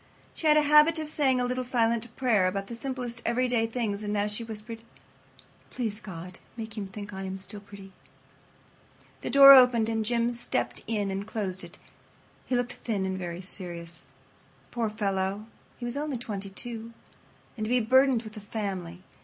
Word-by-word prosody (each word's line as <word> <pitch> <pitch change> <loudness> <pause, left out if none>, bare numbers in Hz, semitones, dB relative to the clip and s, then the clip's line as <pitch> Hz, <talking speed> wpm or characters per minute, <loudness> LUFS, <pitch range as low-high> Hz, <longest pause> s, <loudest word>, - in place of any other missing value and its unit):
She 320 - -2
had 305 0 +6
a 305 - +5
habit 300 +2 +6
of 310 -1 -3
saying 270 -4 +2
a 250 - +1
little 255 +1 -1
silent 235 -1 0
prayer 225 -8 +3
about 195 +1 -2
the 235 - -8
simplest 245 -1 -5
everyday 240 -1 +1
things, 225 -3 -2
and 205 - -3
now 205 0 +1
she 210 +2 -2
whispered: 225 0 -7 0.9
"Please 220 -4 -3
God, 180 -3 -9 0.2
make 220 -1 -6
him 205 -3 -4
think 205 +1 -8
I 190 - -5
am 190 0 -4
still 200 +2 -8
pretty." 200 -1 -13 1.3
The - - -4
door 275 0 +10
opened 250 -4 +6
and 225 -1 0
Jim 235 +1 +1
stepped 240 - -2
in 205 -3 -1
and 195 +2 -4
closed 190 -4 -3
it. - - -11 0.7
He 255 - 0
looked 245 0 0
thin 205 -5 -2
and 190 0 -2
very 175 -1 -5
serious. 170 -3 -8 0.6
Poor 230 -2 -1
fellow, 200 -1 -2 0.3
he 240 - -6
was 240 +1 -3
only 290 -2 -2
twenty 205 -4 -5
two—and 230 +1 -9
to - - -3
be 250 +1 +3
burdened 255 +1 +4
with 215 0 -10
a - - -6
family! 190 -4 -5
220 Hz, 180 wpm, -28 LUFS, 200-245 Hz, 1.3 s, door